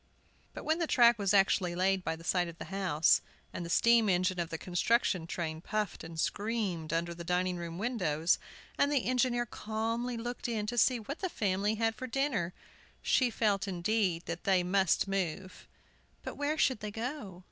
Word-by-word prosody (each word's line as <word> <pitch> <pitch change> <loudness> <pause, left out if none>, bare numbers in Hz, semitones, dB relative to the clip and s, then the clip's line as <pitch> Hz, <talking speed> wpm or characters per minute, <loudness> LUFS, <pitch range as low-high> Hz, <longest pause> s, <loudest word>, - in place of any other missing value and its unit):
But - - -6
when 315 +2 +1
the 335 - 0
track 240 -5 +5
was 200 -2 +1
actually 195 -3 +3
laid 190 +1 +1
by 160 - -1
the 165 - -13
side 175 +1 +1
of 170 -1 -9
the - - -7
house, 175 -5 +3 0.3
and 175 - -4
the 170 - -6
steam 230 +3 +4
engine 185 0 +1
of 170 -1 -2
the 160 - -4
construction 180 0 +1
train 160 -2 -4
puffed 210 0 -3
and 165 0 -8
screamed 200 -6 -2
under 170 +1 -1
the 170 0 -8
dining 180 +1 0
room 170 -1 -6
windows, 180 -8 +1 0.4
and 285 - +3
the 280 -4 +1
engineer 250 -1 +1
calmly 230 +2 -3
looked 240 +2 -4
in 215 -3 -1
to 240 +3 -4
see 250 0 +4
what 270 +8 -6
the 375 - -2
family 205 - 0
had 225 +1 +1
for 255 +4 -6
dinner, 235 -9 -1 0.5
she 255 -2 +3
felt, 210 -3 0
indeed, 185 -1 0
that 170 0 -5
they 190 -2 +3
must 190 +1 +2
move. 190 -1 -3 0.6
But - - -5
where 290 +2 -1
should 260 -6 +2
they 210 - -5
go? 225 -4 -5
195 Hz, 190 wpm, -31 LUFS, 175-235 Hz, 0.6 s, track